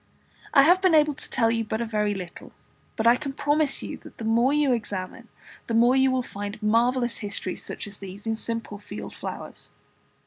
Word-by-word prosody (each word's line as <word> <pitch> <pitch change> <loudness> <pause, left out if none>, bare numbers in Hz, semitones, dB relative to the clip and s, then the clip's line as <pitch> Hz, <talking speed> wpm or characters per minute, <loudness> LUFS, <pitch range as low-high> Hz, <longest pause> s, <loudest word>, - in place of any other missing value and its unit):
I 275 - +7
have 355 +5 +5
been 370 -4 +5
able 300 -1 +4
to - - -6
tell 230 -3 +2
you 230 0 0
but 220 0 -3
very 210 -3 0
little, 180 -3 -8 0.4
but 220 - -2
I 235 +1 +7
can 275 +1 -5
promise 290 0 +1
you - - -5
that - - -15
the - - -7
more 235 +4 +3
you 290 -3 +3
examine, 210 0 -4 0.4
the 230 - -1
more 240 +3 +5
you 265 0 +4
will 260 -1 +1
find 205 -2 -6
marvellous 240 +3 +2
histories 200 -3 -4
such - - -6
as 205 0 -9
these 195 +2 -9
in 225 - 0
simple 225 -2 -4
field - - -8
flowers. - - -6
230 Hz, 200 wpm, -25 LUFS, 210-265 Hz, 0.4 s, I